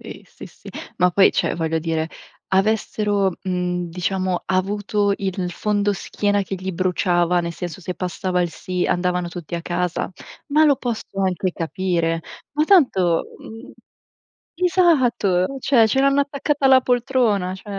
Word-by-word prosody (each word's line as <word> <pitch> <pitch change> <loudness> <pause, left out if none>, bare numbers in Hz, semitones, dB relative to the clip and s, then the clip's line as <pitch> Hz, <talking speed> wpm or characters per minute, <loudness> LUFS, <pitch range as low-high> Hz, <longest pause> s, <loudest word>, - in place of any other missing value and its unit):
qEh - - -10
sì, - - -12
sì, - - -15 0.3
ma 180 - +4
poi 190 +2 +5
cioè, - - 0
voglio 160 -1 -1
dire, 160 0 -2 0.4
avessero, 205 -1 +1
mhmm, 180 -1 -2
diciamo 185 +1 -2
avuto 205 +2 0
il 190 -2 -3
fondoschiena 205 +1 0
che 195 - -5
gli 190 +1 -4
bruciava, 180 -1 +1
nel 170 0 -4
senso, 175 0 -6
se 180 0 -5
passava 180 0 -2
il 175 - -2
sì 180 +2 -3
andavano 180 -1 0
tutti 175 -1 -7
a 170 - -3
casa. 175 0 -2 0.4
Ma 305 +2 +4
lo 285 -3 +4
posso 235 -3 -4 0.2
anche 185 0 0
capire, 165 -1 -1 0.3
ma 300 +1 +1
tanto, 195 - +3
uhm 235 +5 -11 0.9
Esatto. 260 - +3
Cioè, 240 -4 +4
ce 265 - +2
l'hanno 275 +1 +4
attaccata 280 0 0
alla 260 -1 +6
poltrona. 240 -7 +1
Cioè, 190 - -13
190 Hz, 145 wpm, -21 LUFS, 180-225 Hz, 0.9 s, alla